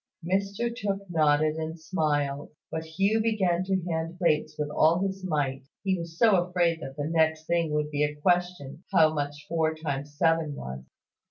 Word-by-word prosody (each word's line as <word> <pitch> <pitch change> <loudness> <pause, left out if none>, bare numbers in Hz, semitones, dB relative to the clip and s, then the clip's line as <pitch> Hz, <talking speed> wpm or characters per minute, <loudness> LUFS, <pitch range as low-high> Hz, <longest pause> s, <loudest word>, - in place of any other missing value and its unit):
Mr 200 +6 -1
Tooke 200 -3 -3
nodded 155 -1 +3
and 160 +1 -4
smiled; 145 -4 -1 0.2
but 160 - -3
Hugh 195 +7 +1
began 190 -6 +1
to 190 -1 0
hand 165 +1 -3
plates 155 -3 +1
with 150 -1 -2
all 160 +3 +4
his 190 -1 -4
might, 140 -6 -1 0.2
he 190 -1 +1
was 165 -1 -7
so 220 -2 +5
afraid 175 -2 +1
that 135 -2 -7
the 145 - -2
next 160 0 +1
thing 170 -2 +1
would 150 0 -1
be 145 0 +1
a 150 0 -1
question 175 -2 0
how 160 -4 +5
much 145 0 -4
four 160 -1 0
times 145 -2 -5
seven 165 -2 +2
was. 65 - -6
160 Hz, 175 wpm, -27 LUFS, 150-180 Hz, 0.2 s, so